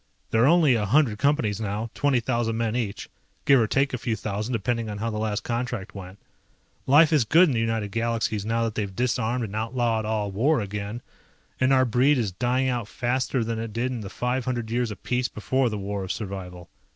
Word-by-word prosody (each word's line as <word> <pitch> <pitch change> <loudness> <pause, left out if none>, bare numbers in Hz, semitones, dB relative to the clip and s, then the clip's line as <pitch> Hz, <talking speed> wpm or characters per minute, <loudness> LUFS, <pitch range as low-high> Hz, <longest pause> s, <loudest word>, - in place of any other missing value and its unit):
There 115 - +3
are - - +6
only 160 -4 +5
a 105 -4 0
hundred 120 -3 +3
Companies 130 -8 +1
now, 110 +2 -3
twenty 140 -3 +2
thousand 115 -1 -1
men 115 -1 -1
each, 105 -5 -3 0.4
give 140 -2 +6
or 110 - +2
take 135 +4 +1
a 125 - -2
few 115 -1 -1
thousand 105 +2 -4
depending 115 +1 -1
on 105 - -5
how 115 +2 -2
the 105 - -3
last 105 -2 -2
contract 120 -3 -3
went. 95 -1 -9 0.7
Life 150 +4 +6
is 150 -5 +4
good 165 +10 +5
in - - 0
the 115 - 0
United 115 -2 -1
Galaxies 115 -2 -1
now 115 +2 0
that 115 -1 -1
they've 100 -4 -3
disarmed 120 0 0
and 105 -1 -7
outlawed 115 0 0
all 105 -2 -1
war 130 +9 +2
again, 105 +3 -5 0.6
and 130 +1 +3
our 130 -1 +5
breed 130 +5 +3
is 110 -6 -1
dying 125 +7 0
out 120 -4 -1
faster 125 +2 -1
than 115 0 -3
it 115 -1 -5
did 120 +3 -1
in 120 -3 -4
the 100 - -7
500 125 -1 -2
years 120 0 0
of 105 -3 -9
peace 125 0 0
before 125 +5 0
the 105 - -4
War 100 0 -4
of 95 - -4
Survival. 90 -4 -6
115 Hz, 215 wpm, -25 LUFS, 105-125 Hz, 0.7 s, are